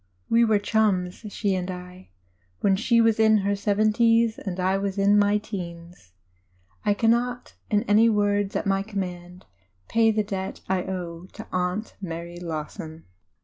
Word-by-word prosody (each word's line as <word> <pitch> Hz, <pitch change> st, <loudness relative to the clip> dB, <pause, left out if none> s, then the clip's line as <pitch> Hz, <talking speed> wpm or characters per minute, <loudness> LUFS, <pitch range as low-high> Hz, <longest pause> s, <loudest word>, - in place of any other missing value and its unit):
We 230 Hz, +1 st, +5 dB
were 220 Hz, -2 st, +4 dB
"chums," 205 Hz, -2 st, 0 dB
she 200 Hz, -1 st, -1 dB
and 185 Hz, 0 st, -2 dB
I, 180 Hz, 0 st, -9 dB, 0.5 s
when 195 Hz, -1 st, +3 dB
she 230 Hz, +3 st, +2 dB
was 225 Hz, -1 st, +3 dB
in 220 Hz, -2 st, +4 dB
the 200 Hz, -, +2 dB
seventies 220 Hz, +3 st, +2 dB
and 185 Hz, -2 st, -5 dB
I 185 Hz, +1 st, +1 dB
was 195 Hz, 0 st, -2 dB
in 200 Hz, +1 st, +4 dB
my 205 Hz, 0 st, +3 dB
teens. 175 Hz, -, -8 dB, 0.7 s
I 205 Hz, -, +2 dB
cannot, 240 Hz, +3 st, 0 dB, 0.2 s
in 210 Hz, -1 st, +2 dB
any 225 Hz, +1 st, +4 dB
words 205 Hz, -1 st, +1 dB
at -, -, -1 dB
my 195 Hz, -1 st, +1 dB
command, 180 Hz, -3 st, -6 dB, 0.4 s
pay 225 Hz, -1 st, +4 dB
the 215 Hz, -1 st, +1 dB
debt 195 Hz, -2 st, -5 dB
I 190 Hz, -1 st, +1 dB
owe 180 Hz, -2 st, -6 dB
to -, -, -9 dB
Aunt 185 Hz, +4 st, -2 dB
Mary 170 Hz, -1 st, -6 dB
Lawson. 160 Hz, -1 st, -6 dB
200 Hz, 155 wpm, -25 LUFS, 180-215 Hz, 0.7 s, We